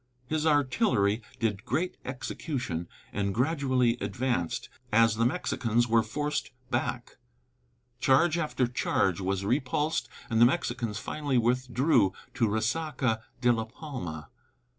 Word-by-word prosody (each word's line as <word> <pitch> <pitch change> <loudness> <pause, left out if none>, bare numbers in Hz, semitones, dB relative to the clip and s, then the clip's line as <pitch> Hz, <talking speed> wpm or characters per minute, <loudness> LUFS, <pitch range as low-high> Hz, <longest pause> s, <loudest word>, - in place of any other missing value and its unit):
His 155 +3 0
artillery 130 - +2 0.2
did 110 -4 -1
great 165 +8 -1
execution, 125 - -4 0.3
and 100 -1 -1
gradually 130 -3 +2
advanced, 100 -3 -1 0.2
as 115 0 +5
the 115 +2 +3
Mexicans 120 -6 0
were 115 0 +4
forced 145 +7 -2 0.2
back. - - -2 0.8
Charge 150 +6 +4
after 150 -6 0
charge 100 -6 0
was 95 +1 -1
repulsed, 135 +6 0 0.2
and 115 -2 +1
the - - +10
Mexicans 120 -7 -1
finally 145 +4 -1
withdrew 125 - +2 0.2
to 120 -4 +2
Resaca 120 +1 0 0.2
de 120 -1 +5
la 115 -1 -1
Palma. 110 - -7
120 Hz, 120 wpm, -29 LUFS, 110-140 Hz, 0.8 s, the